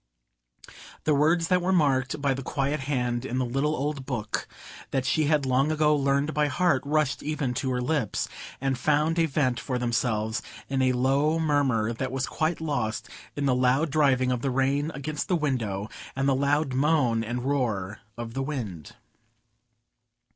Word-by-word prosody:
The 155 Hz, -, +2 dB
words 160 Hz, +4 st, +3 dB
that 180 Hz, 0 st, +3 dB
were 180 Hz, +2 st, 0 dB
marked 140 Hz, -4 st, +2 dB
by 140 Hz, -1 st, +1 dB
the 135 Hz, -, -4 dB
quiet 140 Hz, +2 st, -1 dB
hand 125 Hz, -3 st, -1 dB
in 130 Hz, -1 st, -3 dB
the 130 Hz, -, +1 dB
little 135 Hz, +5 st, 0 dB
old 145 Hz, 0 st, -2 dB
book 120 Hz, -5 st, -3 dB, 0.4 s
that 130 Hz, -1 st, -1 dB
she 155 Hz, +3 st, +2 dB
had 150 Hz, -2 st, +2 dB
long 130 Hz, +3 st, +2 dB
ago 150 Hz, -1 st, +3 dB
learned 140 Hz, +1 st, +1 dB
by 150 Hz, -1 st, +2 dB
heart, 165 Hz, -1 st, +2 dB
rushed 150 Hz, -4 st, +1 dB
even 145 Hz, -4 st, -2 dB
to 130 Hz, -, -1 dB
her 125 Hz, -1 st, 0 dB
lips, 130 Hz, -6 st, -1 dB, 0.3 s
and 135 Hz, -1 st, -1 dB
found 150 Hz, +4 st, +2 dB
a 165 Hz, -, +3 dB
vent 135 Hz, -4 st, 0 dB
for 130 Hz, -3 st, -2 dB
themselves 115 Hz, -2 st, 0 dB, 0.3 s
in 135 Hz, -1 st, 0 dB
a 130 Hz, -1 st, +3 dB
low 135 Hz, +5 st, +2 dB
murmur 140 Hz, -8 st, +1 dB
that 130 Hz, +2 st, -3 dB
was 135 Hz, 0 st, -1 dB
quite 160 Hz, +1 st, -1 dB
lost 140 Hz, -9 st, -2 dB, 0.3 s
in 145 Hz, -, -1 dB
the 135 Hz, -, +3 dB
loud 130 Hz, +5 st, +2 dB
driving 135 Hz, -4 st, +3 dB
of 125 Hz, -2 st, -1 dB
the 135 Hz, -, 0 dB
rain 135 Hz, +3 st, +1 dB
against 150 Hz, +2 st, -4 dB
the 180 Hz, -, +2 dB
window 115 Hz, -, -1 dB, 0.3 s
and 135 Hz, +1 st, 0 dB
the 135 Hz, -, +4 dB
loud 140 Hz, +1 st, +1 dB
moan 130 Hz, -5 st, +2 dB
and 120 Hz, +2 st, -3 dB
roar 110 Hz, -8 st, -1 dB, 0.2 s
of 115 Hz, -1 st, -6 dB
the 135 Hz, -, -2 dB
wind. 115 Hz, -, -5 dB
135 Hz, 175 wpm, -26 LUFS, 125-150 Hz, 0.4 s, the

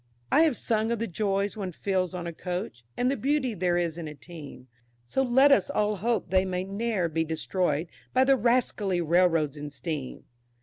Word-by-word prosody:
I 310 Hz, -, +6 dB
have 315 Hz, -6 st, +3 dB
sung 220 Hz, 0 st, 0 dB
of 235 Hz, -, 0 dB
the 230 Hz, -, -2 dB
joys 200 Hz, +1 st, -1 dB
one 195 Hz, -4 st, -4 dB
feels 185 Hz, 0 st, -1 dB
on 175 Hz, -1 st, -4 dB
a 170 Hz, -, -4 dB
Coach, 180 Hz, -, -5 dB
And 250 Hz, +1 st, +2 dB
the -, -, 0 dB
beauty 270 Hz, 0 st, 0 dB
there 175 Hz, -2 st, +1 dB
is 170 Hz, -1 st, -1 dB
in 165 Hz, -, -5 dB
a 150 Hz, -, -8 dB
team, 145 Hz, -4 st, -11 dB, 0.4 s
So 265 Hz, -, 0 dB
let 265 Hz, +2 st, +5 dB
us 275 Hz, -, +4 dB
all 210 Hz, -6 st, 0 dB
hope 230 Hz, +4 st, -1 dB
they 185 Hz, 0 st, +3 dB
may 185 Hz, -1 st, -2 dB
ne'er 200 Hz, -1 st, -1 dB
be 160 Hz, 0 st, 0 dB
destroyed 160 Hz, 0 st, -1 dB, 0.2 s
By 260 Hz, -, +4 dB
the 270 Hz, +1 st, +5 dB
rascally 225 Hz, -6 st, +1 dB
railroads 165 Hz, -3 st, +2 dB
and 145 Hz, 0 st, -6 dB
steam. 140 Hz, 0 st, -5 dB
185 Hz, 200 wpm, -27 LUFS, 165-230 Hz, 0.4 s, I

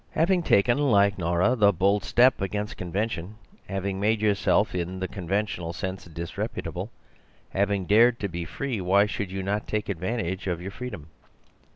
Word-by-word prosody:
Having 175 Hz, +3 st, +2 dB
taken, 120 Hz, -3 st, +3 dB
like 100 Hz, -8 st, +3 dB
Nora, 85 Hz, +6 st, +2 dB
the 105 Hz, -4 st, +5 dB
bold 100 Hz, +2 st, +2 dB
step 125 Hz, -1 st, +4 dB
against 105 Hz, +2 st, -3 dB
convention, 95 Hz, +1 st, -3 dB, 0.3 s
having 95 Hz, -1 st, -2 dB
made 110 Hz, +2 st, +2 dB
yourself 105 Hz, 0 st, +2 dB
in 90 Hz, +1 st, -3 dB
the 95 Hz, -, -2 dB
conventional 95 Hz, -2 st, -3 dB
sense 95 Hz, +1 st, -5 dB
disreputable, 85 Hz, 0 st, -5 dB, 0.6 s
having 100 Hz, -1 st, 0 dB
dared 115 Hz, +5 st, +5 dB
to 100 Hz, -, 0 dB
be 85 Hz, -2 st, -5 dB
free, 115 Hz, -, -4 dB
why 95 Hz, +3 st, +4 dB
should 100 Hz, -2 st, -4 dB
you 95 Hz, 0 st, -3 dB
not 105 Hz, +2 st, -2 dB
take 105 Hz, -1 st, -2 dB
advantage 95 Hz, 0 st, -3 dB
of 90 Hz, -2 st, -1 dB
your 95 Hz, +3 st, -6 dB
freedom? 105 Hz, -10 st, -7 dB
100 Hz, 160 wpm, -26 LUFS, 90-105 Hz, 0.6 s, the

